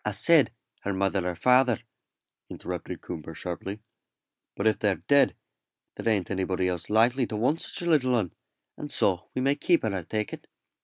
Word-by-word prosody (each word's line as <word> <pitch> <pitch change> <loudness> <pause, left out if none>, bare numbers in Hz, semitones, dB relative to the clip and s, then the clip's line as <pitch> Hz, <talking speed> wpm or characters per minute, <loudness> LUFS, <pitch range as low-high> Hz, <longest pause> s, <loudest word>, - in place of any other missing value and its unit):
"I - - 0
said - - +5 0.3
her 100 - -2
mother 95 -1 0
or 90 - -4
father," 125 +3 +4 0.7
interrupted - - -6
Coomber, 80 -2 -7
sharply; 95 +5 -6 0.7
"but 100 - -3
if 110 - +3
they're 100 -3 +2
dead, 140 -1 +4 0.6
there - - -2
ain't 100 -4 -1
anybody 95 -1 0
else 90 -2 -3
likely 120 +4 +3
to 110 - -5
want 130 +9 +1
such - - -3
a 170 - -1
little 130 -5 +3
'un, 100 -8 -1 0.4
and 150 -1 -6
so 90 -3 +1
we 130 - -1
may 140 +1 +3
keep 170 +4 +2
her, 110 -3 -1
I 95 - -2
take 105 +5 -3
it. - - -9
105 Hz, 185 wpm, -27 LUFS, 95-125 Hz, 0.7 s, said